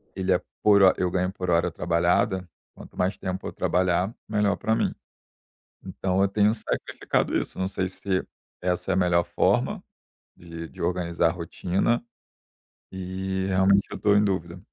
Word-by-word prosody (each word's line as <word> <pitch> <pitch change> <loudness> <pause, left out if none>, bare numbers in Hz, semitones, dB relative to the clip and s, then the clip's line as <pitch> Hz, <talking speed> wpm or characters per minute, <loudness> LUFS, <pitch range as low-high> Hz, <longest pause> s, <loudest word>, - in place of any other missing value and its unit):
ele 95 0 -1
é 90 0 +3 0.2
por 100 -2 +6
hor 95 -1 +7
eu 90 - +1
ganho 90 0 0
por 90 -1 -5
hora 85 +1 +2
trabalhada, 90 +2 +1 0.2
quanto - - -14
mais 95 +2 +1
tempo 95 0 -4
eu - - -6
trabalhar 90 +3 +1
melhor 105 -1 +1
pra 110 - 0
mim. - - 0 0.9
Então 95 0 -1
eu 100 - +4
tenho 105 +1 +3
sacrificado 110 - -1
isso - - -4
não 95 - 0
sei 95 -1 -2
se 95 0 -2 0.4
essa 90 +1 -1
é - - +3
a - - +1
melhor 90 -2 +3
forma, - - +1 0.5
de 85 -1 -9
de - - -11
organizar 85 -1 +1
rotina, 90 +6 -1 0.9
e 95 0 -3
realmente 95 +1 +4
eu - - -5
estou 105 -1 +3
em 105 - +4
dúvida. 90 -3 -2
95 Hz, 165 wpm, -25 LUFS, 90-95 Hz, 0.9 s, hor